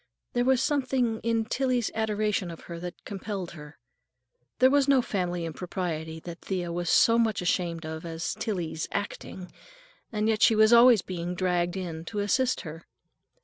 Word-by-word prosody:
There 245 0 +1
was 260 0 +3
something 255 -6 0
in 225 -1 0
Tillie's 250 -1 0
adoration 210 -3 0
of 165 - -9
her 170 -1 -8
that 175 0 -8
compelled 195 -2 -5
her. 150 -2 -12 0.8
There 260 +1 +5
was 285 -1 +3
no 275 -2 +5
family 180 -5 -2
impropriety 160 -1 -4
that 170 0 -9
Thea 180 -3 -3
was 175 0 -2
so 230 0 +5
much 225 -2 +1
ashamed 170 -2 -1
of 160 0 -6
as 165 0 -3
Tillie's 175 -8 -3
"acting" 190 -2 -5 0.6
and 215 -1 0
yet 220 -1 +1
she 225 - +6
was 215 +2 +5
always 235 -2 +7
being 180 -1 -4
dragged 180 0 0
in 165 -4 -5
to 210 - -6
assist 245 +6 +1
her. 165 0 -9
190 Hz, 165 wpm, -27 LUFS, 170-230 Hz, 0.8 s, always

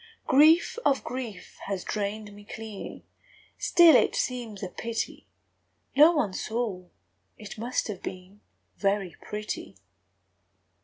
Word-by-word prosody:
Grief 315 - +5
of 275 -1 +2
grief 230 -7 -7
has 195 -2 -3
drained 210 0 -3
me 205 0 -13
clean; 215 -1 -8 0.6
Still 340 -4 +7
it - - +4
seems 235 -6 -3
a - - -2
pity 230 +5 -4 0.7
No 300 +4 +8
one 235 - 0
saw, 215 -4 -3 0.5
it 210 0 -9
must 240 +3 -1
have 205 -4 -6
been 185 +3 -8 0.4
Very 195 -3 0
pretty. 210 0 -5
215 Hz, 115 wpm, -27 LUFS, 200-250 Hz, 0.7 s, No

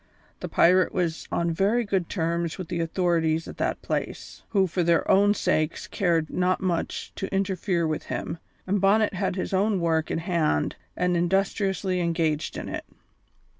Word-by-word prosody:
The - - -5
pirate 185 +2 +4
was 170 -3 -1
on 170 0 0
very 205 +8 +1
good 190 -4 -1
terms 170 -2 -1
with 185 -2 -6
the 175 -2 -2
authorities 165 -1 +1
at - - -9
that - - -2
place, - - -4
who 195 -3 +3
for 180 0 -1
their 170 0 +2
own 205 +2 +5
sakes 155 -4 0
cared 170 -6 0
not 185 0 +1
much 175 -3 -2
to 195 - -4
interfere 190 -2 0
with 155 -1 -2
him, 165 - -4 0.3
and 195 +1 0
Bonnet 205 +2 +3
had 190 0 -1
his 190 - -3
own 200 +1 +2
work 160 -2 +1
in - - -1
hand 165 - 0 0.2
and 180 0 +1
industriously 190 +1 0
engaged 165 -3 0
in - - -5
it. - - -5
180 Hz, 170 wpm, -26 LUFS, 165-195 Hz, 0.3 s, own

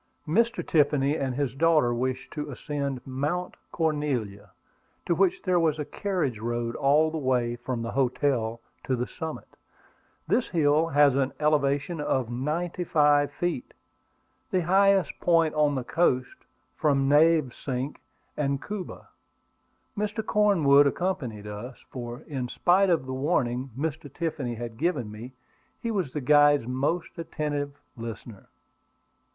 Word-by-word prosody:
Mr. 230 +8 +1
Tiffany 145 -2 +3
and 135 -4 -2
his 135 -3 -1
daughter 150 -4 +3
wished 130 +2 -3
to 150 -1 -5
ascend 140 -1 -4
Mount 145 +7 -2 0.2
Cornelia, 145 - -2 0.6
to - - +2
which 365 -1 +1
there 185 -2 +2
was 160 -2 +2
a 150 - -3
carriage 165 - -2
road 120 +1 -2
all 150 +3 +3
the 160 - -3
way 125 -3 0
from 120 -1 -4
the 115 - -4
hotel 125 -3 0 0.2
to 130 - 0
the 125 0 -2
summit. 160 +3 -7 0.8
This 250 - +1
hill 155 -1 +3
has 145 -3 +4
an 135 -1 0
elevation 150 +1 +1
of 130 -5 -1
ninety 160 +8 -2
five 145 -3 +3
feet, 175 - -3 0.7
the 185 - +1
highest 195 +2 +3
point 165 -2 +3
on 150 -1 +2
the 130 - -2
coast 130 -4 0 0.3
from 135 -3 +2
Navesink 145 -3 +2 0.3
and 140 -2 0
Cuba. 205 +1 -7 0.9
Mr. 210 +1 -2
Cornwood 160 -11 +5
accompanied 135 - -2
us, 105 +5 -8
for, 120 +1 -6
in 135 -6 -4
spite 185 +7 +3
of 165 -6 +2
the 130 - -5
warning 130 -3 0
Mr. 150 -1 -4
Tiffany 140 -7 -3
had 115 -1 -7
given 140 -9 -1
me, 115 +5 -9 0.5
he 230 - -3
was 185 -11 -1
the 150 - -3
guide's 145 0 +5
most 140 +8 -2
attentive 145 -3 -3 0.2
listener. 115 -2 -8
145 Hz, 135 wpm, -27 LUFS, 130-165 Hz, 0.9 s, Cornwood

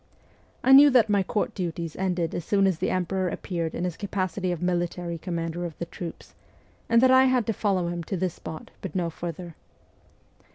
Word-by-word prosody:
I 265 - +4
knew 280 +2 +10
that 245 -5 +4
my 200 -1 +3
Court 205 +2 -1
duties 170 -4 -4
ended 180 -3 -1
as 175 - -3
soon 195 +3 +2
as 185 -4 +1
the - - 0
emperor 185 0 -1
appeared 170 -2 -4
in 175 - -3
his 180 -2 -2
capa 195 -2 -2
city 185 +1 -3
of 175 - -3
military 175 -1 -2
commander 170 0 -3
of 170 -3 -6
the 170 - -4
troops, 170 0 -9 0.6
and 230 +1 +5
that 260 - +6
I 260 0 +7
had 255 -3 +2
to 225 - 0
follow 190 -4 0
him 170 0 -3
to 190 - -3
this 180 -1 -1
spot, 160 - -9
but 190 -3 -6
no 175 -2 0
further. 170 +1 -6
180 Hz, 205 wpm, -26 LUFS, 170-200 Hz, 0.6 s, knew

